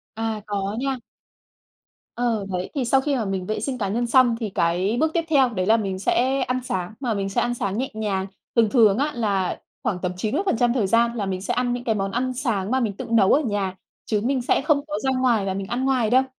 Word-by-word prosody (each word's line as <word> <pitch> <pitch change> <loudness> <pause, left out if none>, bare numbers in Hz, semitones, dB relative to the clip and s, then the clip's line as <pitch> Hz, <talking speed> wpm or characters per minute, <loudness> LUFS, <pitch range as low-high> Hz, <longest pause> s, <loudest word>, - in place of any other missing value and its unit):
À, 225 -1 -2
có 200 0 -2
nha. 270 0 -1 1.2
Ờ, 230 -4 0
đấy, 180 -1 -3
thì 270 -3 0
sau 265 +3 +3
khi 280 0 0
mà 230 - -1
mình 190 -2 -2
vệ 215 +2 -2
sinh 255 +3 -3
cá 205 -5 -1
nhân 235 +4 0
xong 245 -1 +5
thì 220 -3 -3
cái 185 +5 0
bước 315 +1 +1
tiếp 335 - +2
theo 275 -5 +4
đấy 185 -6 -2
là 225 +2 +5
mình 195 -4 -3
sẽ 260 +7 +1
ăn 255 0 0
sáng, 185 -4 -3
mà 250 -4 -1
mình 195 -1 -2
sẽ 195 - 0
ăn 240 - 0
sáng 200 -4 -2
nhẹ 260 +2 -1
nhàng. 200 -3 -2 0.3
Thường 230 -3 +4
thường 215 -4 +5
á 290 +3 0
là 200 -5 0 0.2
khoảng 185 - -1
tầm 180 - -1
90 240 - +1
thời 225 -6 +1
gian 235 +3 +3
là 210 - -2
mình 185 -1 -3
sẽ - - -2
ăn 245 -1 0
những 245 0 -4
cái 225 -3 0
món 195 -1 -2
ăn 255 +3 -1
sáng 230 -6 -1
mà 260 - +2
mình 225 -5 -1
tự - - -5
nấu 220 -4 +5
ở 295 - +4
nhà, 205 -7 -2 0.3
chứ 210 -2 0
mình 260 +1 +1
sẽ 240 - +2
không 285 0 +1
có 300 - -3
ra 265 - +1
ngoài 235 -6 +2
và 190 - -1
mình 195 0 -4
ăn 245 +4 -1
ngoài 255 -5 +2
đâu. 255 +2 +5
230 Hz, 255 wpm, -23 LUFS, 195-255 Hz, 1.2 s, xong